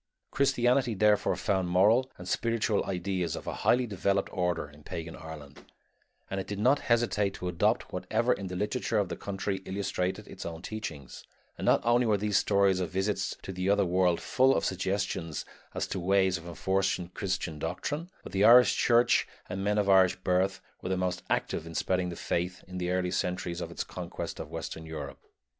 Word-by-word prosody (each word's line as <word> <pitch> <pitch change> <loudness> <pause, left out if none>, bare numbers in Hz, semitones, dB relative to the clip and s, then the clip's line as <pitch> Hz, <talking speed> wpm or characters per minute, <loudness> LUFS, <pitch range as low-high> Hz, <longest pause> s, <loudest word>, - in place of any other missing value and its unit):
Christianity 125 -3 +2
therefore 105 +1 +3
found 95 -3 0
moral 110 +9 +4
and 90 - -9
spiritual 115 0 +1
ideas 90 -2 -2
of - - -7
a - - -3
highly 125 +1 +3
developed 100 -2 0
order 90 -4 0
in 75 +1 -17
pagan 80 +2 -6
Ireland, 75 -3 -10 0.6
and 95 - -3
it 95 - -5
did 100 - -4
not 130 +7 +3
hesitate 115 -4 +1
to 90 - -5
adopt 85 -1 0
whatever 110 +7 +1
in 100 - -5
the 90 - -5
literature 110 +3 -1
of 100 -4 +1
the - - -3
country 100 0 -3
illustrated 95 +1 -2
its 95 - -8
own 85 0 -6
teachings, 80 - -6 0.3
and - - -5
not - - +4
only 120 +1 +4
were 105 -2 +3
these 105 0 +1
stories 100 -2 +3
of 90 - -2
visits 95 +2 -1
to 95 - -6
the 90 +1 -1
other 100 -1 +4
world 90 -1 +2
full 130 +1 +3
of - - 0
suggestions 95 -3 -2 0.3
as - - 0
to - - -4
ways 95 0 +2
of 85 - -12
enforcing 95 +1 0
Christian 90 -5 -3
doctrine, 145 - -3
but - - -9
the 95 +1 +1
Irish 120 +3 +8
church 120 0 +4 0.2
and 95 +1 -4
men 105 +1 +1
of 105 -1 +2
Irish 95 -1 +5
birth 95 +1 0 0.2
were 90 - -4
the 95 - 0
most 90 0 -1
active 80 - -1
in 80 - -9
spreading 90 +1 0
the 85 - -5
faith 90 +2 -2
in 90 0 -6
the 90 0 -1
early 90 0 0
centuries 90 -1 -2
of - - -4
its - - -4
conquest - - -6
of - - -6
western 80 - -6
Europe. 80 -1 -6
95 Hz, 190 wpm, -29 LUFS, 90-105 Hz, 0.6 s, Irish